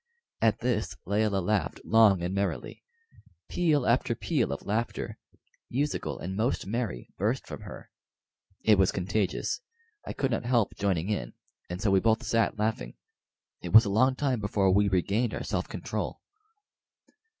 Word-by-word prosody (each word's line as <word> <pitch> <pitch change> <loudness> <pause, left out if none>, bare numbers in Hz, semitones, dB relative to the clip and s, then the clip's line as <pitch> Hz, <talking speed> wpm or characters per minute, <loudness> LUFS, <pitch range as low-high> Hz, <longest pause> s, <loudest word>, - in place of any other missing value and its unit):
At 115 0 +2
this 105 -7 -1
Layelah 100 -1 +1
laughed 105 0 0
long 105 -5 +5
and 90 +2 -2
merrily. 100 0 -3 0.7
Peal 155 -7 +2
after 120 0 +2
peal 140 - 0
of 70 - -5
laughter, 110 +3 -2 0.5
musical 145 +4 -2
and 95 +2 -5
most 115 +6 0
merry, 105 - -3
burst - - 0
from - - -8
her. - - -10 0.7
It 105 -3 +5
was 95 - +4
contagious; 100 +2 -1 0.4
I - - -6
could 135 -1 -1
not 115 - -1
help 120 -3 +1
joining 95 -2 0
in, - - -3 0.4
and 90 +1 -4
so 100 0 +1
we 95 - +5
both 110 +3 +2
sat 115 -1 +1
laughing. 105 - -2 0.7
It - - -6
was 110 +1 +9
a 100 - -1
long 130 +5 +3
time 130 -4 0
before 100 -2 +1
we 100 +1 +3
regained 100 +6 +1
our - - -4
self - - -2
control. - - -4
105 Hz, 155 wpm, -28 LUFS, 95-120 Hz, 0.7 s, was